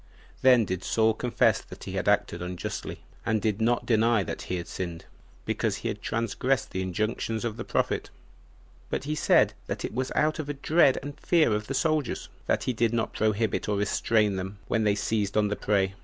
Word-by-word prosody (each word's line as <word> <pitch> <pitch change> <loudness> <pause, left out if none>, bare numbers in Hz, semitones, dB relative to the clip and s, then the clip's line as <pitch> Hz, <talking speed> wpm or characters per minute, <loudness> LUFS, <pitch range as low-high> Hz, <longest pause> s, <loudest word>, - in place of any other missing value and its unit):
Then 125 -4 +6
did 95 -1 -3
Saul 110 0 +3
confess 120 +2 +2
that - - -12
he - - -6
had - - -2
acted 85 - +2
unjustly, 90 0 -5 0.2
and 110 -1 +1
did 105 0 -1
not 120 +2 +2
deny 115 -2 +3
that - - -5
he 90 - -3
had 85 -1 -4
sinned, 85 -3 -5 0.4
because - - 0
he - - -3
had - - -5
transgressed 115 +4 -1
the 95 - -2
injunctions 110 +4 -2
of 115 -2 -2
the - - -5
prophet; - - -1 0.8
but - - -2
he 150 +2 -2
said 105 -8 +4
that 100 - -3
it - - -5
was 130 +2 -2
out 155 +1 +2
of 150 -2 -4
a 145 - -2
dread 140 -1 +4
and 145 +1 -7
fear 160 -10 +3
of 105 0 -2
the 135 - -2
soldiers, 155 -1 0 0.2
that - - +1
he 130 - 0
did 115 0 +1
not 110 - -1
prohibit 110 0 0
and 105 -1 0
restrain 105 0 +2
them 95 +2 -5
when 110 -2 +1
they 105 -1 +3
seized 105 -1 -1
on 105 -1 +3
the 105 - -1
prey. 95 -2 +1
110 Hz, 205 wpm, -27 LUFS, 100-125 Hz, 0.8 s, Then